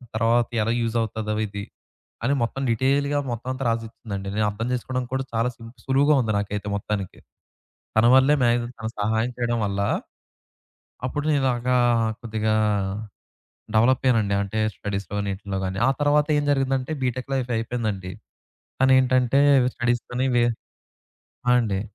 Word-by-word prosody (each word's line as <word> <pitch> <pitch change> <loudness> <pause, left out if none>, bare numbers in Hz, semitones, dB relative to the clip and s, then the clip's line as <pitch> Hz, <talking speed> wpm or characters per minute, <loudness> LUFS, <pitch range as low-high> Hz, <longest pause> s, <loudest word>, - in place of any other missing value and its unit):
తరువాత 115 +1 +2 0.2
ఎలా 115 - 0
యూజ్ 115 0 -2
అవుతాదో 110 -1 -3
ఇది. 100 0 -6 0.6
అని 135 - +2
మొత్తం 125 +3 -3
డీటెయిల్‌గా 140 +4 +1
మొత్తమంతా 130 +3 -4
రాసిచ్చిందండి. 110 -3 -4
నేనర్థం 105 +2 -1
చేసుకోవడంకి 125 0 -3
కూడా 135 0 -2
చాలా 115 +2 +1
సింపుల్ 115 0 -13
సులువుగా 140 +3 +4
ఉంది 110 - -1
నాకైతే 105 0 -4
మొత్తానికి. 100 -2 -4 0.8
తన 110 - +5
వల్లే 135 +3 +5
మాక్సిమం 120 0 +1
తను 110 +1 -4
సహాయం 110 +3 0
చేయడం 120 -1 0
వల్ల, 100 0 -2 1.3
అప్పుడు 145 +3 -3
నేను 145 -2 +2
ఇలాగా 125 0 +1 0.2
ఆహ్, 110 -1 +1
కొద్దిగా 110 -1 -1 1.2
డెవలప్ 125 +4 +4
అయ్యానండి. 110 -5 +3
అంటే 100 +2 -4 0.2
స్టడీస్‌లోని 100 0 -3
ఈటిల్లో 95 -1 -4
గాని. 95 +1 -4
ఆ - - +5
తర్వాతేం 145 0 +2
జరిగిందంటే 135 0 0
బీటెక్ 130 +2 -3
లైఫ్ 125 -2 -2
అయిపోయిందండి. 110 -5 -3 0.7
తనేంటంటే, 130 0 +4 0.3
స్టడీస్‌‌కని 120 +2 -1
వే 120 - +4 1.0
ఆ! 125 - +6
అండి. 100 -4 -1
120 Hz, 130 wpm, -24 LUFS, 110-130 Hz, 1.3 s, ఆ